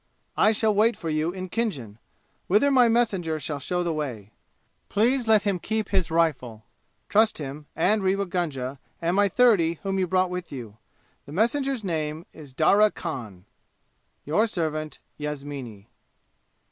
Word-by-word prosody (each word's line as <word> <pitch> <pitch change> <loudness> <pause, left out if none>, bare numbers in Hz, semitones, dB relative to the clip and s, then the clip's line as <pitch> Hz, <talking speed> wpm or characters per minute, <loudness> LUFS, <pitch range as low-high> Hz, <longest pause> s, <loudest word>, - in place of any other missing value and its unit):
I 215 - +4
shall 220 0 +2
wait 220 +3 +3
for 165 - -4
you 155 +2 0
in 185 0 -6
Khinjan, 145 - -3 0.5
whither 215 +10 +4
my 250 -3 +6
messenger 195 -9 +1
shall 145 0 -4
show 180 +6 -1
the 170 -1 -1
way. 120 -10 -5 0.6
Please 235 +4 +1
let 215 -2 +5
him 200 -3 0
keep 220 +3 -2
his 190 -4 +1
rifle. 135 -10 0 0.4
Trust 220 +1 +3
him, 145 0 -7
and 210 +6 +2
Rewa 195 +1 +1
Gunga 140 -8 -3 0.2
and 170 +2 0
my 205 0 +4
thirty 190 -8 +4
whom 195 -1 -1
you 185 - +1
brought 185 0 +1
with 180 -1 -5
you. 115 -6 -8 0.5
The 145 - -9
messenger's 245 - 0
name 160 -2 -3
is 150 -4 -12
Darya 210 +7 +5
Khan. 115 - -7 0.8
"Your 210 +10 +2
servant, 155 -6 -3 0.2
"Ysamini." 140 -8 -6
175 Hz, 150 wpm, -25 LUFS, 150-210 Hz, 0.8 s, my